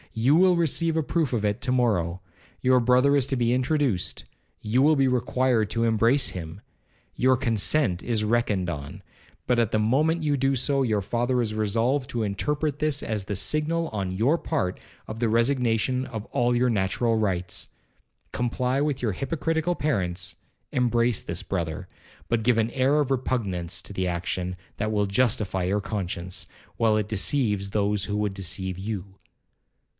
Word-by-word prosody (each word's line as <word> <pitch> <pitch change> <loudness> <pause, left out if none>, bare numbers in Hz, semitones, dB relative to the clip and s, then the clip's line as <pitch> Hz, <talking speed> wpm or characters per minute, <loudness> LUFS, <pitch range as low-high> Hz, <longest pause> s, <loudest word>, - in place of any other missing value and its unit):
You 125 +6 +3
will 180 +1 +5
receive 165 0 +1
a 160 - +1
proof 160 -1 0
of 110 -4 0
it 105 0 -1
to 130 - 0
morrow,—your 105 +2 0
brother 125 +4 +4
is 140 -3 +3
to 135 - 0
be 120 0 +2
introduced,—you 125 - -1
will 155 +3 +5
be 135 -2 +3
required 125 -3 +1
to 115 - -1
embrace 115 +4 +3
him,—your 95 +8 -3
consent 115 - +1
is 110 -3 0
reckoned 105 -4 +1
on, 70 -3 -6 0.4
but 125 -1 +2
at 115 -3 +1
the 110 - +1
moment 155 +9 +2
you 145 -1 +1
do 135 0 +1
so, 135 +2 +1
your 110 -5 +1
father 120 +5 0
is 110 -3 -1
resolved 115 +5 0
to 115 -2 -2
interpret 145 +8 -1
this 150 -2 0
as 105 -3 -2
the 100 - -3
signal, 155 - 0
on 95 -3 -3
your 115 - +2
part, 135 - -2 0.3
of 110 +1 -6
the 115 -2 +1
resignation 125 +1 +1
of 110 -3 -6
all 120 0 +1
your 125 +1 +2
natural 115 +2 +1
rights. 90 -5 -1 0.7
Comply 125 +2 0
with 145 -3 -1
your 110 -5 0
hypocritical 160 - -1
parents, 90 - -1 0.4
embrace 120 -2 +1
this 85 0 -4
brother, 85 -1 -3 0.4
but 115 -1 0
give 120 0 +3
an 115 +1 +1
air 135 +4 +2
of 140 -2 0
repugnance 100 -10 -1
to - - -7
the 95 -1 -1
action 90 +1 -3 0.2
that 110 +1 -1
will 105 -1 +1
justify 100 -3 0
your 95 +3 +1
conscience, 90 -4 -4 0.3
while 110 -2 +2
it 105 -1 -1
deceives 105 -2 0
those 100 -1 0
who 105 +2 -2
would 105 -1 -1
deceive 95 -1 -3
you. 100 -1 -5
115 Hz, 165 wpm, -25 LUFS, 100-130 Hz, 0.7 s, will